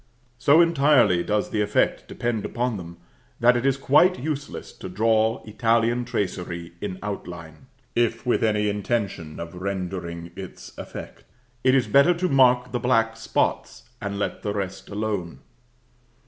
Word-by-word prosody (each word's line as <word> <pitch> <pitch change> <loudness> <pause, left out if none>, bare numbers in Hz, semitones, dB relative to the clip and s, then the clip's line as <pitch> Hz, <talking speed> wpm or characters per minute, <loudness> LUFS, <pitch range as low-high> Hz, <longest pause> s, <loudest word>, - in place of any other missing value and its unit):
So 145 +6 +6
entirely 145 - +4
does 105 +1 -1
the 105 - 0
effect 105 0 +1
depend 120 -3 -2
upon 120 -2 -2
them, 85 -1 -9 0.4
that 125 +1 +5
it 120 +2 +1
is 135 -1 +2
quite 150 +7 +4
useless 145 0 -5
to 95 - -7
draw 110 +3 +1
Italian 115 +2 +1
tracery 90 -6 -3
in 95 -3 -4
outline; 85 - -7 0.3
if 115 0 +1
with 125 - +1
any 105 -1 +2
intention 100 -6 -2
of 85 0 -6
rendering 90 -2 -4
its 95 -2 -10
effect, - - -9 0.4
it 130 +1 +4
is 130 -3 +3
better 140 +10 +5
to 180 +2 0
mark 125 -4 +4
the 125 - -1
black 115 -3 +2
spots, 115 - -1 0.2
and 100 -1 -3
let 100 - -3
the 105 -1 -3
rest 95 -2 -4
alone. 100 -5 -3
110 Hz, 150 wpm, -24 LUFS, 95-125 Hz, 0.4 s, So